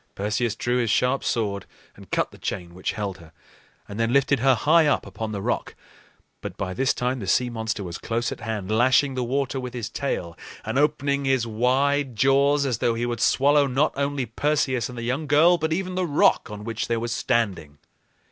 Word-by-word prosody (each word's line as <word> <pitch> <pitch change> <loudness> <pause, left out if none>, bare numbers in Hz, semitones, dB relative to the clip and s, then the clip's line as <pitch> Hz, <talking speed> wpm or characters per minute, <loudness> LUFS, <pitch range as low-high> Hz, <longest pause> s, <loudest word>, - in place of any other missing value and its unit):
Perseus 105 +3 -1
drew 120 +1 -1
his 120 -2 0
sharp 125 +5 +1
sword 100 -4 -2 0.3
and - - -15
cut - - 0
the - - -15
chain 85 -3 -5
which 90 +1 -3
held 100 -4 -4
her, 80 -1 -15 0.6
and 100 +2 -7
then 115 0 +1
lifted 140 0 +3
her 130 +1 +4
high 155 +5 +4
up 145 - +1
upon 105 +3 -5
the 100 -2 -4
rock. - - -2 0.7
But - - -7
by 95 -2 -3
this 130 +5 +1
time 125 +1 -2
the 100 - -6
sea 125 +6 +2
monster 110 -3 -3
was 90 -1 -6
close 120 +1 -2
at - - -6
hand, 105 -3 -4
lashing 130 +4 +3
the 130 -1 -2
water 135 +2 -1
with 125 -1 -6
his 115 -3 -4
tail 90 -13 -3 0.3
and 110 +5 -1
opening 140 -1 +1
his 130 -3 +2
wide 130 +4 +1
jaws 140 +3 +3
as 125 -5 -1
though 115 -1 +1
he 120 +1 -1
would 120 -2 -3
swallow 145 +1 +4
not 135 +4 +1
only 140 -1 -1
Perseus 130 0 0
and 125 - -9
the 120 - -5
young 130 +6 -2
girl, 165 +5 +5
but 160 +1 -1
even 185 +2 -2
the 180 -1 -1
rock 160 -1 +3
on 105 0 -8
which 115 0 -3
they 115 - 0
were 115 +1 -3
standing. 100 - -1
125 Hz, 210 wpm, -24 LUFS, 110-140 Hz, 0.7 s, girl